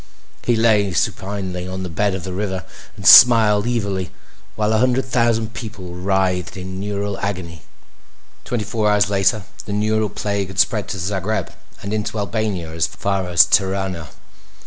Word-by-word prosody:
He 120 - +1
lay 105 -4 +2
supinely 95 +2 -2
on 95 0 -5
the - - -4
bed 95 +4 -1
of 95 - -6
the 95 - -5
river 95 -2 -3 0.3
and - - -9
smiled 110 -3 +8
evilly 100 -7 -2 0.5
while 105 0 0
a 110 - +2
hundred 130 +2 +2
thousand 115 -3 0
people 110 -7 -8
writhed 90 0 -1
in 95 0 -6
neural 100 0 -3
agony. 90 -5 -5 0.8
Twenty 120 -3 -3
four 110 0 0
hours 105 0 +2
later 95 +1 +1 0.2
the 100 - -4
neural 110 +1 0
plague 100 -1 -2
had 95 -1 -11
spread 105 +1 +2
to - - -5
Zagreb 95 +2 -2 0.3
and 100 +2 -4
into 110 +1 -3
Albania 100 -6 -3
as 80 0 0
far 95 0 -2
as 85 -1 +6
Tirana. 95 -4 0
100 Hz, 160 wpm, -20 LUFS, 95-110 Hz, 0.8 s, smiled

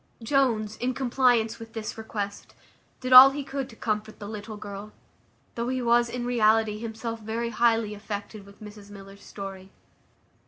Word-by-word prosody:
Jones, 225 -5 +1
in 250 +1 -2
compliance 245 -3 +1
with 225 0 -11
this 220 -1 -5
request, 210 -2 -6 0.5
did 255 0 0
all 255 +2 +12
he 280 +1 -5
could 270 -1 -5
to 225 - -13
comfort 215 -1 -3
the 205 - -8
little 215 0 -7
girl, 205 0 -9 0.6
though 235 0 -3
he 255 0 -1
was, 240 -1 +3
in 240 0 -4
reality, 220 -3 +2
himself 230 0 -5
very 225 +2 -3
highly 225 -1 +2
affected 205 0 -7
with 200 +2 -16
Mrs 205 -1 -12
Miller's 200 0 -13
story. 195 -1 -9
220 Hz, 160 wpm, -26 LUFS, 210-240 Hz, 0.6 s, all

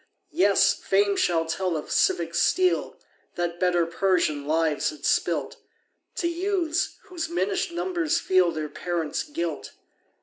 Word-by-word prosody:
Yes, 200 - +4
Fame 200 +1 +1
shall 165 -3 +1
tell 175 +1 -1
of 150 - -7
civic 170 -1 +1
steel 360 - +1 0.4
That 175 0 -3
better 175 -2 +2
Persian 170 -5 0
lives 160 -1 +1
had 310 - -9
spilt, - - 0 0.6
To 340 - -1
youths, 345 -1 -1
whose 355 -6 -5
minish'd 370 +1 -1
numbers 345 -2 -1
feel 185 -2 +3
Their 155 -2 -4
parents' 165 +1 -3
guilt. 170 - -5
185 Hz, 130 wpm, -25 LUFS, -, 0.6 s, Yes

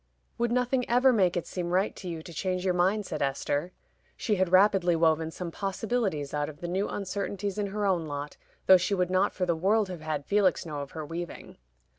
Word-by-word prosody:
"Would 235 0 +1
nothing 250 +1 +1
ever 250 +2 +5
make 185 -6 +2
it 175 - -2
seem 175 -2 -4
right 185 +4 +1
to 185 - -8
you 165 -2 -5
to 170 - -10
change 185 +2 -2
your 185 - +2
mind?" 190 +4 +1
said - - -4
Esther 145 +4 -1 0.5
(she 220 - 0
had 185 -1 +1
rapidly 185 -2 +5
woven 160 -1 +2
some 170 +1 -6
possibilities 195 - -2
out 145 0 -1
of 150 -1 -11
the 175 - -5
new 190 +4 -1
uncertainties 200 +1 -3
in 205 - 0
her 205 +1 -2
own 175 -5 +1
lot, 145 0 -5 0.3
though 190 - +8
she 185 +3 0
would 180 -1 0
not 185 0 +3
for 185 - -2
the 170 -2 +1
world 200 +4 +2
have 180 -3 -6
had 155 -2 -3
Felix 200 -4 +2
know 150 -3 -5
of 140 -1 -7
her 155 -2 -5
weaving). 170 +3 -7
185 Hz, 220 wpm, -28 LUFS, 165-200 Hz, 0.5 s, though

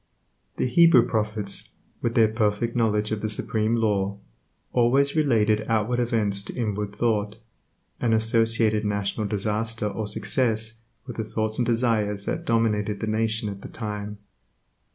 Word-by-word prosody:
The - - 0
Hebrew 130 -2 +5
prophets, 105 -3 -1 0.3
with 115 - -1
their 115 -2 +6
perfect 110 +1 0
knowledge 105 -3 +1
of 110 -1 -2
the 110 - -1
Supreme 110 +1 0
Law, 100 -3 0 0.6
always 135 +4 +3
related 110 -8 +2
outward 115 +2 +1
events 110 -5 0
to 100 - -8
inward 105 -3 -2
thought, 105 -1 0 0.6
and 120 - +1
associated 115 -1 +2
national 100 +1 -1
disaster 110 +2 -1
or 105 +1 -3
success 110 0 -1 0.3
with 125 -3 -8
the 110 - -1
thoughts 110 +1 -2
and 120 - +1
desires 110 -4 +1
that - - -3
dominated 105 -3 +1
the - - -2
nation 110 +1 0
at 100 -1 -6
the - - -9
time. 105 -2 -5
110 Hz, 145 wpm, -25 LUFS, 105-115 Hz, 0.6 s, their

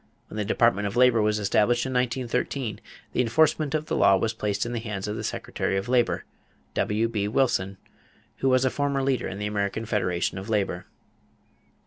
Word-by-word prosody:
When - - -8
the 105 - 0
Department 105 -1 +2
of 100 - -5
Labor 125 -2 +5
was 105 0 +2
established 110 +4 +2
in 130 - -3
1913 125 -2 -1 0.3
the - - +2
enforcement 150 +4 +2
of 155 0 -1
the - - -2
law 100 - +5
was 110 +4 -1
placed 105 -2 -1
in 120 - -4
the 120 - -1
hands 105 -3 -4
of 105 - -3
the - - -5
Secretary 95 - -2
of 95 - -3
Labor, 125 -1 +1 0.5
W.B. 105 -1 0
Wilson, 105 -5 +1 0.6
who 135 - +1
was 130 0 +3
a 130 - +2
former 140 -1 0
leader 130 -3 0
in 95 - -6
the 105 - -3
American 105 +1 -2
Federation 95 -5 -1
of 95 - -8
Labor. 105 -3 -1
115 Hz, 185 wpm, -26 LUFS, 105-125 Hz, 0.6 s, Labor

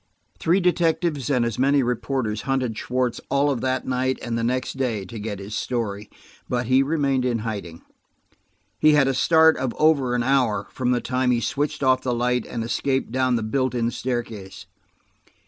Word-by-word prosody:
Three 175 +4 +2
detectives 170 -5 +1
and 125 -4 +2
as 115 -1 -3
many 140 +1 +3
reporters 120 -2 -2
hunted 130 -4 0
Schwartz 125 +1 -2
all 140 +1 +2
of 130 - -2
that 130 0 -1
night 130 0 0
and 120 -1 -3
the 115 - -1
next 130 +2 -1
day, 115 -7 -1
to 110 +4 -8
get 105 -1 -4
his 100 +2 -8
story. 105 -3 -3 0.4
But 125 0 -1
he 130 +3 +4
remained 140 -3 +1
in 125 -2 0
hiding. 100 -7 -6 1.0
He 155 0 +5
had 145 -2 +4
a 135 - +1
start 160 +4 +4
of 130 -2 -2
over 140 -6 +3
an 120 - 0
hour; 120 -6 +1
from 125 -1 -2
the 125 -1 +1
time 130 +1 0
he 120 -1 +3
switched 140 +4 -2
off 130 -1 +3
the 125 -2 -1
light 125 0 0
and 115 - -4
escaped 130 +2 -1
down 130 0 +1
the 115 - -1
built 130 +3 -1
in 120 -1 0
staircase. 115 -7 -5
125 Hz, 185 wpm, -23 LUFS, 115-135 Hz, 1.0 s, He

